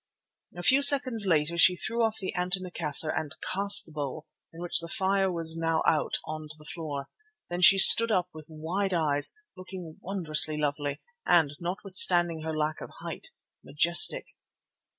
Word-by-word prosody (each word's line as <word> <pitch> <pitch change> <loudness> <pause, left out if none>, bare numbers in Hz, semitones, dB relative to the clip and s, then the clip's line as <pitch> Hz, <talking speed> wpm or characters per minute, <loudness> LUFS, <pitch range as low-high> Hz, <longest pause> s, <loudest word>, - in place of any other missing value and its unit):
A 175 - -9
few 265 +7 +2
seconds 265 -7 +4
later 165 0 -2
she 180 +2 +4
threw 230 +5 -4
off 220 -1 -3
the 190 - -7
antimacassar 180 -4 0
and 155 0 -7 0.2
cast 200 +2 +4
the - - -19
bowl, 150 +1 -8 0.3
in 165 - -16
which 175 0 0
the 170 - -7
fire 195 +1 -2
was 165 -2 -2
now 165 -1 -3
out, 155 - -2
on 155 0 -9
to 155 - -13
the 150 - -19
floor. 145 -4 -9 0.4
Then 175 +1 -6
she 195 +2 +6
stood 230 +4 +8
up 185 -3 -2
with 155 -1 -14
wide 175 +5 -5
eyes, 145 - -1 0.2
looking 185 -3 -12
wondrous 170 -6 0
lovely 145 -1 -6 0.2
and, 155 - 0
notwithstanding 175 -2 0
her 160 0 -7
lack 155 0 -5
of - - -11
height, - - -10 0.3
majestic. 165 +5 +2
170 Hz, 165 wpm, -25 LUFS, 155-190 Hz, 0.4 s, stood